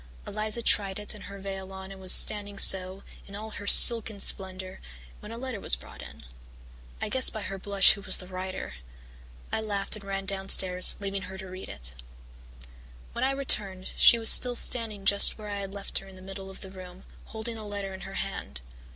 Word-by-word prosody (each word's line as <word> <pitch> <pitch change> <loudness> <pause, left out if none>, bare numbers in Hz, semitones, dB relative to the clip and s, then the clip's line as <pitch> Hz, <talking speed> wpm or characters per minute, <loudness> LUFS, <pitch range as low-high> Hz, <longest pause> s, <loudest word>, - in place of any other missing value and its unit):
Eliza 215 +2 -4
tried 195 -4 +1
it 210 0 -3
and 210 -2 -13
her 200 - -11
veil 195 -1 -9
on 190 0 -12
and 190 -1 -14
was 185 -1 +1
standing 205 -1 +5
so, 190 0 +4 0.2
in 200 - -13
all 220 +2 -10
her 205 -1 -11
silken 225 -2 +6
splendour, 190 -1 -2 0.4
when 210 - -13
a 230 - -9
letter 250 -3 -8
was - - +1
brought - - -15
in. - - -14 0.8
I - - -5
guessed 260 +4 0
by 215 -3 -8
her 195 -1 -8
blush 200 0 +2
who 200 - -5
was 190 -1 +2
the 185 - -11
writer. 185 - -9 0.8
I - - -4
laughed 200 -2 -5
and 215 - -12
ran 195 0 -7
downstairs, 190 -1 +4
leaving 200 -1 -6
her 190 +1 -10
to 190 - -11
read 185 0 -11
it. 60 +1 -4 1.2
"When - - -5
I 265 - 0
returned 205 -9 -2
she 235 - +4
was 225 -1 +5
still 250 -1 +5
standing 220 -5 +1
just 200 0 +2
where 210 -1 -11
I 205 0 -6
had 195 -1 -9
left 200 0 -7
her 195 - -16
in 190 - -16
the 185 - -16
middle 195 0 -11
of 190 - -14
the 190 - -11
room, 185 -1 -14 0.2
holding 220 +1 -8
the 220 - -11
letter 200 -2 -8
in 190 - -12
her - - -10
hand. 65 -1 -7
195 Hz, 210 wpm, -25 LUFS, 190-210 Hz, 1.2 s, silken